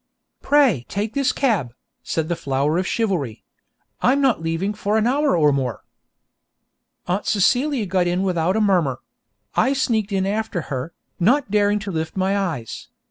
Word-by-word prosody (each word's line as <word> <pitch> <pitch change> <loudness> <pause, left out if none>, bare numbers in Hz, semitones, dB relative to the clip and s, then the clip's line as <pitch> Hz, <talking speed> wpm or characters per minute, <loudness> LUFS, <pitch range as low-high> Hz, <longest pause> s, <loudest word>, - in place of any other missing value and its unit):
'Pray 265 - +3
take 205 +2 -3
this 275 -1 +1
cab,' 180 - 0 0.3
said 160 -1 -2
the 170 - -1
flower 145 +1 0
of 185 - -2
chivalry. 175 - -2 0.6
'I 250 - +4
am 280 - +1
not 260 -10 +2
leaving 165 +5 -1
for 210 +1 -1
an 220 - +2
hour 280 -2 +2
or 150 -2 +4
more.' 130 -5 -2 1.2
Aunt 180 +3 -1
Celia 245 +5 +2
got 185 -1 +1
in 180 +2 0
without 180 -1 0
a 220 - +2
murmur; 175 -11 +1 0.5
I 265 - +2
sneaked 220 -6 0
in 190 -1 0
after 210 -2 -2
her, 130 +5 -4 0.3
not 240 +5 +2
daring 205 0 +3
to 200 - -4
lift 160 +1 -4
my 190 +1 +1
eyes. 160 - -3
195 Hz, 165 wpm, -21 LUFS, 165-220 Hz, 1.2 s, I